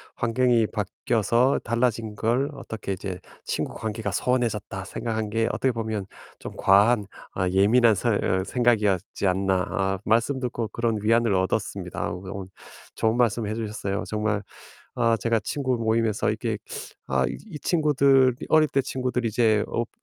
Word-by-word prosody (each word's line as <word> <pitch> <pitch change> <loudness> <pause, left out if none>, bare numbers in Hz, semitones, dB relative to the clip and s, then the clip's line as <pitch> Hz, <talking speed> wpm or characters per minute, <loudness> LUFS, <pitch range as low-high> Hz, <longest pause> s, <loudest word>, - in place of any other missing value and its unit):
환경이 120 -1 +2
바뀌어서 115 +5 +1
달라진 115 -2 0
걸 125 +7 +1
어떻게 110 -7 -6
이제 95 -1 -5 0.3
'친구관계가 110 0 -3
소원해졌다.' 115 -6 -1
생각한 110 +1 -3
게 115 +1 +1
어떻게 130 - +1
보면 110 -4 -3 0.3
'좀 - - -8
과한 105 +2 +4 0.3
아 95 -1 0
예민한 110 +4 +4
서 120 +5 0
어 95 -2 +1
생각이었지 105 -5 +1
않나.' 95 0 +1
아 95 0 0
말씀 120 +5 +2
듣고 120 -3 -2
그런 115 +1 -1
위안을 115 0 +3
얻었습니다. 95 0 -1
어 90 - -6
그 95 - -9
오늘 95 -2 -7 0.4
좋은 110 +2 +1
말씀 115 -2 +1
해 110 - -2
주셨어요. 105 -2 -3
정말 105 -1 -1 0.5
아 115 -1 +2
제가 115 +2 +1
친구 130 -1 -1
모임에서 110 -1 +1
이게 - - -2 0.5
'아 65 -1 +1
이 155 - -8
친구들 140 -6 +3
어릴 155 -1 +5
때 135 - +1
친구들이 125 -2 -2
이제 110 -1 +2
없 120 0 -2
115 Hz, 320 characters per minute, -25 LUFS, 100-120 Hz, 0.5 s, 어릴